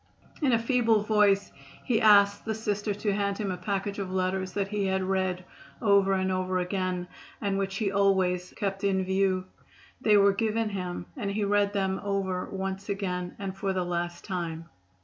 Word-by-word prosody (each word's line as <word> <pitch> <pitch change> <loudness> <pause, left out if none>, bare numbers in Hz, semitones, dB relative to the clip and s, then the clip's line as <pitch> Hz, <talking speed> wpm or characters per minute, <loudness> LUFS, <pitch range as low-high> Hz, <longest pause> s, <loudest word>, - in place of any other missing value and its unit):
In 280 -4 +3
a 230 - +5
feeble 230 -2 +2
voice 205 -2 +3 0.3
he 230 -3 +1
asked 200 -1 +6
the 220 -1 -2
Sister 210 -1 -2
to 205 0 -1
hand 200 0 -1
him 205 -3 -2
a - - -2
package 200 +2 -3
of 190 -2 -4
letters 185 0 -1
that 200 -1 -1
he 205 -1 -1
had 190 0 0
read 185 -1 -1 0.3
over 200 -3 +4
and 190 0 +1
over 185 0 0
again, 180 -1 -2 0.3
and 200 -2 -1
which 195 -1 -2
he 200 -1 0
always 190 -3 +2
kept 195 -1 -2
in 190 -1 +2
view. 190 -1 +1 0.6
They 210 -1 +5
were 200 0 +5
given 220 +1 0
him 180 -3 -4
and 220 -8 -3
he 205 +1 -1
read 205 0 +2
them 190 -1 -1
over 195 -2 -1
once 195 +1 -4
again 180 -3 -3
and 195 -1 -5
for 195 0 -1
the 185 -1 -1
last 175 0 -3
time. 170 -3 -4
195 Hz, 185 wpm, -28 LUFS, 185-205 Hz, 0.6 s, asked